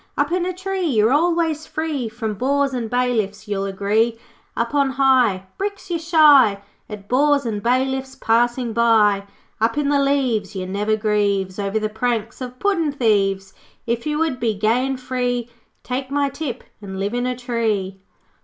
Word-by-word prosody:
'Up - - +1
in 360 0 0
a - - -1
tree 375 +1 -4
You're 225 -3 +3
always 325 -1 +1
free 305 -7 -3
From 220 -1 -4
bores 275 +5 0
and 235 -3 -3
bailiffs, 230 -5 -1
You'll 200 -1 -2
agree. 210 +4 0 0.4
'Up 235 +4 -1
on 280 -2 +2
high 255 -8 +3
Bricks 400 -1 -4
you 335 - 0
shy 300 - +5 0.3
At 205 -2 -9
bores 280 +2 +2
and 210 -3 -2
bailiffs 265 +2 0
Passing 240 +1 +1
by. 215 -3 +3 0.4
'Up 230 +4 +1
in 290 -1 +1
the 285 -1 +3
leaves 265 -7 0
One 185 0 -4
never 210 +2 0
grieves 205 -3 0
Over 200 +1 -1
the 215 0 0
pranks 230 +1 -2
Of 250 0 -6
puddin' 335 -4 +1
thieves. 195 -6 +1 0.3
'If 235 +3 -2
you 300 0 -1
would 310 -5 -1
be 225 -3 0
Gay 225 +6 +1
and 270 -1 -3
free, 245 -2 -2 0.3
Take 260 +1 -4
my 285 0 +1
tip 275 -2 -5 0.2
and 190 -2 -7
Live 200 +3 -2
in 245 +1 -1
a 250 - -1
tree.' 220 -6 -2
245 Hz, 175 wpm, -21 LUFS, 215-280 Hz, 0.4 s, shy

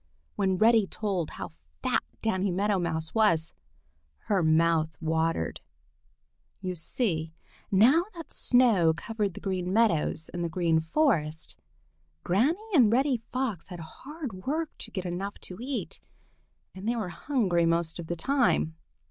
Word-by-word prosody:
When 190 -1 +1
Reddy 220 0 +5
told 190 -7 -2
how - - -7 0.3
fat - - +2 0.2
Danny 200 -3 +1
Meadow 195 +2 +1
Mouse 160 -2 -2
was, 170 -8 +2 0.7
her 200 -3 +1
mouth 160 -1 +2
watered. 160 - -1 1.0
You 185 -2 -3
see 165 -2 -2 0.4
now 250 - +5
that 330 -2 -9
snow 215 -11 +4
covered 210 -1 -2
the - - -6
Green 185 -2 -2
Meadows 180 -7 +2
and 175 0 -4
the 170 - -1
Green 165 -1 +2
Forest, 160 - 0 0.7
Granny 245 - +2 0.2
and 245 -10 +6
Reddy 265 +2 +3
Fox 250 -9 -2
had 180 -3 -8
hard 275 - -8
work 315 +2 -1
to - - -3
get 190 -4 -5
enough 185 +3 -4
to 180 - -6
eat, 265 +1 -4 0.7
and 190 +3 -7
they 240 - +1
were 215 -6 -3
hungry 180 - +1
most 165 0 +1
of 165 - -6
the 175 - -2
time. 160 - +1
185 Hz, 140 wpm, -28 LUFS, 165-230 Hz, 1.0 s, and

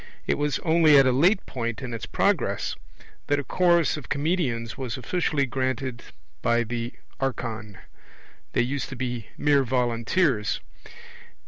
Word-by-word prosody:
It - - 0
was 145 -1 +1
only 160 -3 +6
at 135 - +7
a 130 - +4
late 175 - +3
point 115 -3 -3
in 125 -2 -5
its 115 - -5
progress - - 0 0.5
that 145 0 +2
a - - -3
chorus 170 -2 +3
of 150 - -9
comedians 140 -7 -1
was 130 -4 -4
officially 150 +1 0
granted 130 -1 -2 0.4
by 120 0 +2
the 120 +1 -4 0.3
archon; 115 -6 -3 0.8
they - - +3
used 135 +1 -3
to 135 - -6
be 120 -2 -4
mere 145 -2 +3
volunteers. 120 - +1
130 Hz, 140 wpm, -25 LUFS, 120-145 Hz, 0.8 s, at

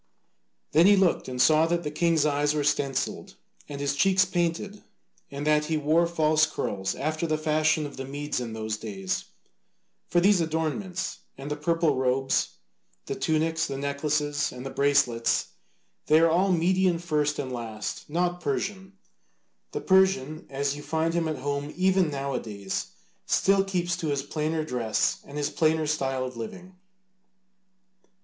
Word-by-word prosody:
Then 165 +4 +6
he 205 - +7
looked 190 -3 +2
closer - - -7
and 125 - -5
saw 155 +4 +5
that 170 +1 0
the 150 - -3
king's 165 -1 +2
eyes 145 0 +1
were 150 - 0
stencilled 140 -2 -1 0.3
and 140 -1 -6
his 140 0 0
cheeks 190 +5 +4
painted, 180 +3 -2 0.5
and 140 +1 -5
that 150 0 +3
he 160 0 0
wore 155 +3 +2
false 155 -2 +3
curls 100 -10 -3
after 155 +3 -2
the 155 -1 0
fashion 155 0 +1
of 145 - -8
the 135 - -4
Medes 145 +2 -3
in 120 -2 -5
those 110 -1 -3
days 95 -4 -4 0.8
(for 175 - +2
these 190 0 +4
adornments, 165 +4 -2 0.2
and 140 +2 -7
the - - 0
purple 160 -1 +1
robes, 130 - 0 0.5
the - - -3
tunics, 160 +1 0
the 135 - -4
necklaces, 145 +1 -1
and 125 +1 -9
the 135 - -5
bracelets, 140 -5 +2 0.6
they 155 +1 +6
are 165 0 +4
all 185 +3 +3
Median 180 +1 +2
first 150 -3 0
and 130 - -4
last, 110 -1 -5
not 175 +2 -1
Persian; 190 +6 -3 0.8
the - - -4
Persian, 190 -6 +2
as 140 +1 -1
you 145 - -8
find 160 +2 -1
him 170 -1 0
at 155 -2 -2
home 140 +2 -3
even 185 -2 +3
now 140 -1 -3
a 125 - 0
days, 100 -4 -4 0.4
still 195 0 +3
keeps 180 -2 -1
to 165 - -3
his 140 -2 -1
plainer 155 +2 -2
dress 120 -6 0
and 145 - -9
his 145 -1 -1
plainer 160 0 +2
style 135 -3 -1
of 130 -1 -7
living.) 180 +11 -8
155 Hz, 165 wpm, -26 LUFS, 140-170 Hz, 0.8 s, he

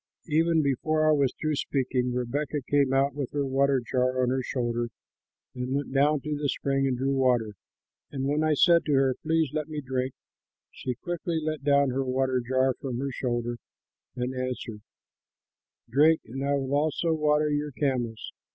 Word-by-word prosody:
"Even 160 +1 +3
before 155 +3 +1
I - - +6
was 140 -4 +3
through 155 -1 0
speaking, 130 -3 -1
Rebekah 140 +5 -2
came 140 -2 +3
out 135 +1 +2
with 140 -3 -4
her 145 -1 0
water 135 0 +2
jar 130 0 +1
on 125 - +2
her 130 0 0
shoulder 120 -2 -2 0.6
and 125 +1 -3
went 140 -1 -3
down 145 +1 +3
to 150 +1 -3
the 145 -1 -1
spring 135 0 0
and 130 -2 0
drew 135 +2 0
water. 125 -5 +2 0.6
And 135 -2 -3
when 145 +3 +1
I 155 -1 +3
said 170 +2 +5
to 150 - +1
her, 135 -1 +3
'Please 160 -3 +1
let 155 -1 -2
me 155 -1 -4
drink,' 130 -1 -3 0.6
she 125 -1 -4
quickly 175 +1 -3
let 155 -2 -3
down 140 -1 +3
her 135 +2 0
water 130 0 0
jar 130 +2 +1
from 130 -3 -4
her 135 +2 -2
shoulder 120 -2 -2 0.6
and 125 +1 -2
answered, 125 -4 -4 1.1
'Drink, 150 +7 +4
and 135 +4 -5
I 140 0 +1
will 135 -1 -2
also 155 +3 +1
water 150 -1 +2
your 145 0 -1
camels.' 125 -5 -2
135 Hz, 180 wpm, -27 LUFS, 130-150 Hz, 1.1 s, I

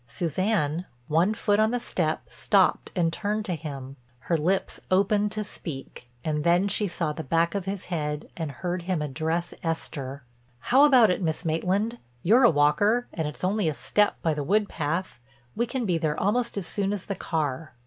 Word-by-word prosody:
Suzanne, 175 - -1 0.2
one 170 +8 +2
foot 205 -2 +1
on 215 0 +4
the 245 +1 0
step, 165 -8 -1
stopped 195 -3 +2
and 165 -2 +1
turned 210 +3 -1
to 185 - -1
him. 140 -4 -7 0.2
Her 170 - 0
lips 180 +5 0
opened 205 +2 +2
to 215 - -2
speak, 135 -10 -8 0.2
and 150 -1 0
then 175 +4 +3
she 205 +1 +1
saw 165 -4 -2
the 160 - -5
back 165 +4 +1
of 200 -3 -2
his 195 -1 -4
head 150 -4 -3
and 160 -3 -3
heard 175 +6 -3
him 175 -3 -1
address 160 +4 -2
Esther: 140 -5 -4 0.3
"How 265 - +5
about 250 -8 +6
it, 180 - -1
Miss 165 0 -1
Maitland? 195 +8 0 0.2
You're 230 +8 +5
a - - +8
walker, 205 +11 +3
and 160 -3 -2
it's 150 - -8
only 190 -2 +1
a 150 - -3
step 210 +7 +2
by 160 - +2
the 150 -1 -3
wood 205 +6 +2
path. 165 -2 -3 0.4
We 235 +2 0
can 255 -2 -2
be 175 -4 +1
there 155 -2 -1
almost 235 +3 0
as 195 - -2
soon 200 +3 -1
as 200 -3 -4
the 200 - -2
car." 155 -5 -3
175 Hz, 190 wpm, -26 LUFS, 155-205 Hz, 0.4 s, a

